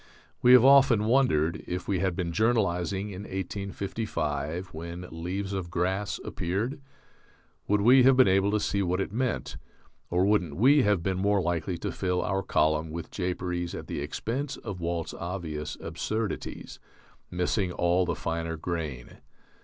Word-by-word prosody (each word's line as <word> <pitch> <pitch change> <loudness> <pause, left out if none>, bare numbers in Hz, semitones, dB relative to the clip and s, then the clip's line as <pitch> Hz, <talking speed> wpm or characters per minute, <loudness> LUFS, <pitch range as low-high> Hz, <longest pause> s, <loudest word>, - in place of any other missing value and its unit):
We 125 - +7
have 125 0 +8
often 135 -6 +6
wondered, 110 - +2
if 90 0 -4
we 95 -3 0
had 95 -1 0
been 85 -2 -2
journalizing 100 -2 0
in 95 0 -7
1855 95 -5 -3
when 85 +3 -6
"Leaves 95 +5 -4
of 95 -3 -3
Grass" 95 +4 -1
appeared, 100 +9 -2 0.9
would 105 0 +2
we 125 +5 +7
have 130 0 +6
been 130 - +7
able 95 +1 +3
to 105 +1 +1
see 100 -1 0
what 90 0 0
it 95 - -2
meant, 125 0 -2 0.5
or 90 +2 +2
wouldn't 90 -8 +1
we 140 - +5
have 105 -6 +2
been 95 0 -1
more 100 +1 +2
likely 85 0 -1
to - - -4
fill 90 -2 -1
our 95 +1 0
column 80 -3 +1
with 85 +1 -6
japeries 90 -2 -3
at - - -6
the - - -4
expense 125 - -3
of 100 -6 -7
Walt's 85 -1 -2
obvious 85 -4 -5
absurdities, 105 +6 -4 0.5
missing 90 +1 0
all 90 +1 +2
the 90 - -1
finer 80 0 -3
grain? 75 -7 -5
95 Hz, 155 wpm, -28 LUFS, 85-105 Hz, 0.9 s, have